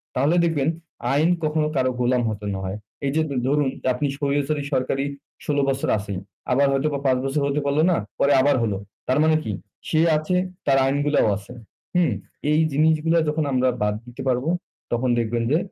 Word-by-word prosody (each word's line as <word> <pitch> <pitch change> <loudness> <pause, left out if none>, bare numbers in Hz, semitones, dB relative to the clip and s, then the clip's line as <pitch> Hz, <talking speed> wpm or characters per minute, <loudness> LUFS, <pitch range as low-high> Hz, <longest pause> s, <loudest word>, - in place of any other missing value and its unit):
তাহলে 140 +6 +2
দেখবেন 150 -4 0 0.5
আইন 155 +4 +3
কখনো 155 0 +1
কারো 130 -1 +2
গোলাম 125 0 +2
হতে 105 -1 -5
না 95 - -3
হয়। 95 +2 -4 0.3
এই 135 - +1
যে 160 - +3 0.3
ধরুন 145 0 +2 0.2
আপনি 145 +4 -1
স্বৈরচারী 145 +1 0
সরকারি 135 +1 0 0.4
১৬ 145 - 0
বছর 135 0 -1
আছেই। 100 -2 -4 0.3
আবার 140 +3 +4
হয়তোবা 140 +1 0
৫ 130 -1 +3
বছর 135 +2 0
হতে 140 +1 0
পারলো 140 +2 +2
না, - - +3 0.2
পরে 140 - +4
আবার 145 +2 +3
হলো। 105 -4 0 0.3
তার 130 +3 +2
মানে 160 0 +4
কি? 110 - -3 0.4
সে 155 - +2 0.2
আছে, 155 +4 -1 0.3
তার 135 -1 +4
আইনগুলাও 145 -1 +2
আছে। 105 +4 -11 0.4
হুম? 180 -1 +3 0.4
এই 155 - +4
জিনিসগুলা 160 +3 +3
যখন 155 +1 0
আমরা 130 0 +3
বাদ 105 0 +1
দিতে 125 +2 -9
পারবো 130 +5 +1 0.4
তখন 120 +2 0
দেখবেন 115 0 -1
যে 155 - +5
140 Hz, 180 wpm, -23 LUFS, 125-150 Hz, 0.5 s, যে